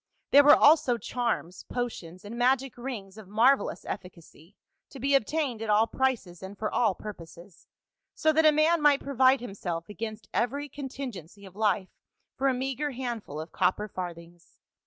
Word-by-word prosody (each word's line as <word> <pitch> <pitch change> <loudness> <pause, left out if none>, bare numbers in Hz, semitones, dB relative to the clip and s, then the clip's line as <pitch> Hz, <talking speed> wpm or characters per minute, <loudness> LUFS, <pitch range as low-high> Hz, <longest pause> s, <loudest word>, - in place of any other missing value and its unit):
There 285 +1 +8
were 295 +1 +8
also 295 -5 +5
charms, 230 -6 -3
potions 195 -7 -5
and 215 +3 -7
magic 260 +1 +1
rings 220 -6 -7
of 210 - -12
marvelous 235 +7 +2
efficacy 180 0 -9 0.3
to 270 - -11
be 275 +3 0
obtained 275 -2 0
at 225 - -4
all 210 +1 +4
prices 230 -9 -2
and 190 +1 -9
for 215 - -3
all 220 -6 +2
pur 210 0 -7
poses, 170 +1 -15 0.5
so 315 0 +2
that 320 +1 +3
a - - +7
man 310 +2 +3
might 290 -2 +4
provide 265 -1 +3
himself 180 -7 -5
against 215 +1 -6
every 280 +5 -1
contingency 250 - -8
of 190 -1 -14
life 210 -3 0 0.5
for 275 - 0
a 265 - +3
meagre 270 +3 -2
handful 235 - -5
of 160 +2 -7
cop 185 0 +1
per 210 - -5
farthings. 175 -2 -9
230 Hz, 170 wpm, -28 LUFS, 190-270 Hz, 0.5 s, There